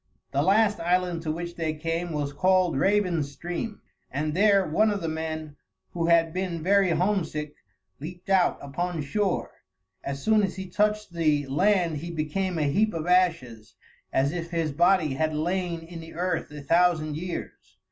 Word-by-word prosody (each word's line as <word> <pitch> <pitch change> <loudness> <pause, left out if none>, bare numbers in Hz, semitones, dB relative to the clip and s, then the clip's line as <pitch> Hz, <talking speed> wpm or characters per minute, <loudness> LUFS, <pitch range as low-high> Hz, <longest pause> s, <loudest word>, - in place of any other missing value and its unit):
The 140 - +1
last 205 +5 +3
island 175 0 0
to 160 -1 -2
which 170 +2 -5
they 160 -2 -1
came 165 +2 -3
was 145 -2 -2
called 185 +1 +2
Raven's 175 -3 +1
Stream, 175 - -5 0.3
and 150 +3 -2
there 200 +1 +4
one 215 +8 +3
of 205 -1 -1
the 165 - -3
men, 155 -1 -4 0.3
who 170 -1 -1
had 165 -1 +4
been 180 -3 -3
very 195 +1 +4
homesick, 165 -4 -1 0.5
leaped 175 +5 -9
out 190 -2 +3
upon 165 +3 -3
shore. 195 +6 -1 0.5
As 140 0 -5
soon 220 -1 +4
as 195 -2 -1
he 190 0 -6
touched 210 +1 0
the 155 -4 +1
land 175 +3 +2
he 170 +4 -6
became 170 +3 -2
a 155 - +1
heap 205 +9 +1
of 160 -1 -3
ashes, 165 -12 +1 0.4
as 135 +2 +2
if 170 0 -4
his 165 -3 -1
body 170 -1 +3
had 155 +2 -1
lain 175 +1 -1
in 165 +1 -9
the 165 0 -11
earth 175 -1 -1
a 150 -1 -9
thousand 160 -1 +2
years. 175 +3 -7
170 Hz, 170 wpm, -26 LUFS, 155-185 Hz, 0.5 s, there